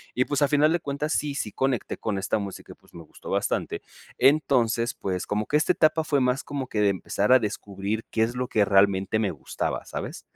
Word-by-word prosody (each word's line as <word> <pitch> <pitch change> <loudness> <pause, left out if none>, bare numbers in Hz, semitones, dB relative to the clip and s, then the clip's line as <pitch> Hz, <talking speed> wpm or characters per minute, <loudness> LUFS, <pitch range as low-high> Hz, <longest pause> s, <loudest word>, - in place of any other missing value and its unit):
y 125 - +2
pues 145 -1 -1
a 145 - +5
final 150 +2 +3
de 175 - +1
cuentas 145 +1 -3
sí 145 -2 -1
sí 105 - -3
conecté 130 +1 -1
con 105 -3 -2
esta 95 +3 -1
música 100 -2 -7
y - - -11
pues - - -24
me 85 - -9
gustó 75 - -12
bastante, - - -1 0.3
entonces 125 -4 +3
pues 90 -2 -3
como 105 +1 -1
que 150 - +2
esta 155 +4 +2
etapa 160 -1 +3
fue 145 -3 +1
más 125 +2 +1
como 140 -2 -4
que 105 -4 -1
de 105 - +4
empezar 100 +3 -1
a - - +9
descubrir 105 0 -3
qué 110 - +1
es 115 +2 -2
lo 125 0 -2
que 105 -4 +2
realmente 100 +1 +3
me 105 -3 +1
gustaba, 75 -7 -4
¿sabes? - - -6
115 Hz, 225 wpm, -25 LUFS, 100-140 Hz, 0.3 s, a